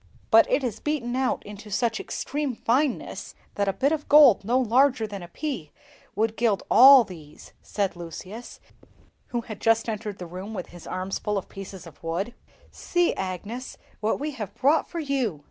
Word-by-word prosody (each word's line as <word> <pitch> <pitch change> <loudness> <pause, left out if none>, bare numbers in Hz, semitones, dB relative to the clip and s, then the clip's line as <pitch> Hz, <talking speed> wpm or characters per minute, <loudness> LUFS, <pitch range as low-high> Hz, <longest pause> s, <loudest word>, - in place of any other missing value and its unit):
"But - - +7
it 295 - +2
is 230 -4 -3
beaten 265 -5 -2
out 260 0 0
into 210 +1 -10
such 225 +2 0
extreme 285 -3 -3
fineness 260 +5 -1 0.2
that 200 0 -1
a 195 - +1
bit 280 +6 +1
of 310 -2 -3
gold 285 -9 +7
no 240 +5 +1
larger 255 0 +3
than 200 -2 -7
a 175 - -8
pea 200 - -5 0.4
would 220 +1 0
gild 225 -4 +1
all 265 +1 +9
these," 160 -7 -13
said 200 -4 -2
Lucius, 185 +7 -9 0.7
who 240 - -2
had 215 -3 -9
just 225 0 +3
entered 215 -2 -4
the 180 - -7
room 185 +5 -7
with 180 - -6
his 175 -1 -12
arms 185 +1 -3
full 210 -1 -1
of 195 - -5
pieces 195 -2 -9
of - - -14
wood. 180 +8 -2 0.4
"See, 350 -1 0
Agnes, 200 +7 -5 0.2
what 215 +1 0
we 300 +2 -3
have 220 -8 -7
brought 295 +4 +2
for 345 - -7
you!" 265 - -1
225 Hz, 180 wpm, -25 LUFS, 195-260 Hz, 0.7 s, all